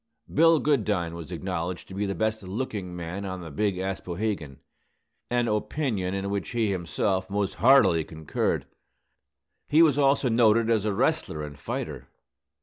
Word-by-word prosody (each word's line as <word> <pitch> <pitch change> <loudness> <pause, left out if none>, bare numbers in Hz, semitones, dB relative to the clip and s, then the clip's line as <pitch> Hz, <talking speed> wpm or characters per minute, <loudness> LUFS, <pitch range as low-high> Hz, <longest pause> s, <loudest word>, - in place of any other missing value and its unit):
Bill 165 +1 +6
Goodine 105 - +1
was 85 0 -8
acknowledged 90 0 -4
to - - -10
be 100 +1 -1
the 100 - -2
best 110 0 -1
looking 95 -2 -4
man 90 +3 -5
on 95 -2 -5
the 80 -2 -8
Big 100 +5 0
Aspohegan, 95 -5 -3 0.7
an 120 0 +1
opinion 105 -3 -1
in 100 0 -3
which 100 -5 -2
he 115 -3 0
himself 95 +2 -1
most 100 -1 -1
heartily 110 -10 +6
concurred. 80 -1 -2 1.0
He 155 +3 +6
was 145 -3 +3
also 140 -1 +3
noted 115 -1 +4
as 110 -2 +2
a 105 - +1
wrestler 75 -4 0
and 75 -1 -7
fighter. - - -5
100 Hz, 150 wpm, -26 LUFS, 90-115 Hz, 1.0 s, Bill